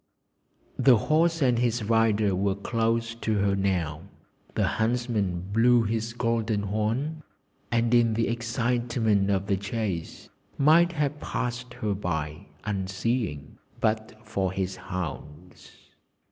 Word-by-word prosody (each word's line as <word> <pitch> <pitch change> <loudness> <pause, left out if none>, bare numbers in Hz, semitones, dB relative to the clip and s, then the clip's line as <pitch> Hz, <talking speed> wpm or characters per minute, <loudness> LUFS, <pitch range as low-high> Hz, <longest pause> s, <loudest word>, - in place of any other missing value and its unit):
The 130 -4 +6
horse 165 +5 +2
and 125 -3 +3
his 120 -1 +1
rider 110 -2 +2
were 95 +1 +1
close 115 +2 0
to 110 -1 -2
her 100 -1 +2
now; 90 -6 -1 0.5
the - - +2
huntsman 110 -6 0
blew 120 +1 +5
his 115 +1 -2
golden 115 -3 0
horn, 115 +10 -1 0.5
and 115 0 +2
in 115 -2 +4
the 115 0 +1
excitement 120 -3 0
of 100 -1 +1
the 100 -1 +1
chase 100 -4 -4 0.3
might 165 +5 +5
have 150 -1 -1
passed 125 -2 -4
her 105 -4 -1
by, 80 -6 -3 0.2
unseeing, 95 - -2 0.2
but 110 0 0
for 95 -3 -1
his 95 0 -2
hounds. 90 -2 -7
110 Hz, 120 wpm, -27 LUFS, 100-120 Hz, 0.5 s, The